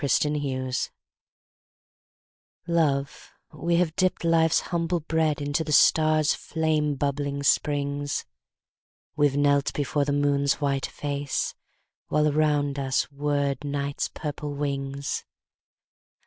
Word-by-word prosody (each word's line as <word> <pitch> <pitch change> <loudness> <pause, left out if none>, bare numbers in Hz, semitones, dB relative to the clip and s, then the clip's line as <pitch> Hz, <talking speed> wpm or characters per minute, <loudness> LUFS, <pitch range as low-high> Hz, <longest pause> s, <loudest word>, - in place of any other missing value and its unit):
Transformation 140 -3 0 1.7
LOVE, 150 -5 0 0.2
we 170 +1 0
have 170 -2 +1
dipped 185 -1 +1
Life's 165 -1 +3
humble 170 0 0
breadInto 155 -1 0
the 155 - -5
stars' 155 0 +4
flame 155 -2 0
bubbling 140 0 -2
springs; 145 0 0 0.9
We've 145 -2 +2
knelt 140 -1 +3
before 145 0 0
the 145 - -1
Moon's 140 -1 +2
white 140 -2 0
face, 145 -1 -3 0.5
While 150 0 +2
around 145 -2 +1
us 135 0 0
whirred 145 0 -1
Night's 140 0 -2
purple 145 -1 -5
wings. 140 -1 -3
145 Hz, 100 wpm, -26 LUFS, 140-155 Hz, 1.7 s, stars